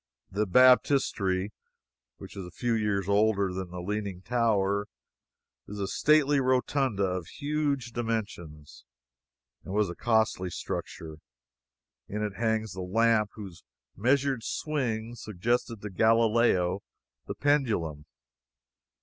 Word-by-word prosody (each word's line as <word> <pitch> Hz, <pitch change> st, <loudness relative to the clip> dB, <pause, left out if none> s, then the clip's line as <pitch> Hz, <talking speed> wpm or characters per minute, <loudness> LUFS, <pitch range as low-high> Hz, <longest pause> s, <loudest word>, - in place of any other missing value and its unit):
The 105 Hz, +2 st, 0 dB
Baptistery, 105 Hz, -5 st, +3 dB, 0.7 s
which -, -, -11 dB
is 95 Hz, -, -6 dB
a 90 Hz, -, -15 dB
few 120 Hz, -1 st, 0 dB
years 105 Hz, -4 st, 0 dB
older 100 Hz, -2 st, +2 dB
than 95 Hz, -1 st, -5 dB
the 90 Hz, 0 st, -7 dB
Leaning 100 Hz, -2 st, -4 dB
Tower, 105 Hz, -4 st, +1 dB, 0.8 s
is 105 Hz, 0 st, -7 dB
a 100 Hz, -, -1 dB
stately 145 Hz, +4 st, +3 dB
rotunda, 130 Hz, -4 st, +1 dB
of 90 Hz, -3 st, -2 dB
huge 145 Hz, -4 st, -2 dB
dimensions, 100 Hz, -11 st, -5 dB, 0.8 s
and 95 Hz, -, -6 dB
was 105 Hz, -4 st, +1 dB
a -, -, -8 dB
costly 110 Hz, -5 st, +1 dB
structure. 80 Hz, -1 st, -6 dB, 0.9 s
In 105 Hz, +1 st, -3 dB
it 105 Hz, -2 st, -3 dB
hangs 110 Hz, -3 st, -1 dB
the 95 Hz, -, -6 dB
lamp 110 Hz, +3 st, +2 dB
whose 95 Hz, -6 st, -10 dB, 0.3 s
measured 135 Hz, +3 st, +1 dB
swing 120 Hz, -8 st, -2 dB
suggested 115 Hz, +1 st, -2 dB
to 105 Hz, -, -6 dB
Galileo 110 Hz, -3 st, +3 dB, 0.5 s
the -, -, -4 dB
pendulum. 110 Hz, -, 0 dB
105 Hz, 115 wpm, -28 LUFS, 95-120 Hz, 0.9 s, Baptistery